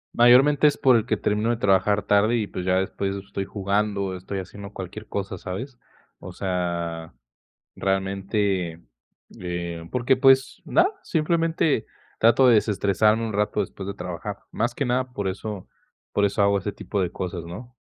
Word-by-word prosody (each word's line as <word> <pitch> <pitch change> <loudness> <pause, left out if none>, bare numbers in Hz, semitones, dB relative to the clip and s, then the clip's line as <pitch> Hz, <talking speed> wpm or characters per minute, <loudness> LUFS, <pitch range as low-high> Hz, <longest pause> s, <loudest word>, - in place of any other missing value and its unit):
Mayormente, 135 +5 +6
es 145 - +1
porque 120 -5 +3
termino 105 +2 0
de 120 - +1
trabajar 100 0 +2
tarde 105 +3 +3
y, 110 - 0
pues, 90 -2 -6
ya 90 0 +2
después 95 +1 -1
estoy 100 0 -5
jugando, 100 0 -1
o 95 - -4
estoy 95 +2 -6
haciendo 100 +2 -8
cualquier 100 +2 -8
cosa, 95 -2 -4
¿sabes? 120 +9 -6 0.4
O - - -9
sea, 85 -4 -3 0.6
realmente, 95 -2 -1 0.6
eh, 85 -2 -5
porque, 125 +1 +2
pues, 135 +1 +4
nada, 345 +3 +3
simplemente 165 -4 +1 0.3
trato 120 +3 +5
de 120 - +7
desestresarme 105 +2 +2
un 110 - -5
rato 105 0 0
después 95 - -5
de 100 - -3
trabajar. 90 -3 -6
Más 120 +2 -1
que 140 - -1
nada, 125 +1 -1
por 100 -4 -2
eso 100 0 -5 0.4
por 100 - +2
eso 100 +1 0
hago 100 0 +3
ese 100 +1 -4
tipo 100 0 -4
de 90 - -1
cosas, 90 -2 -5
¿no? 120 +9 -9
100 Hz, 160 wpm, -24 LUFS, 95-120 Hz, 0.6 s, de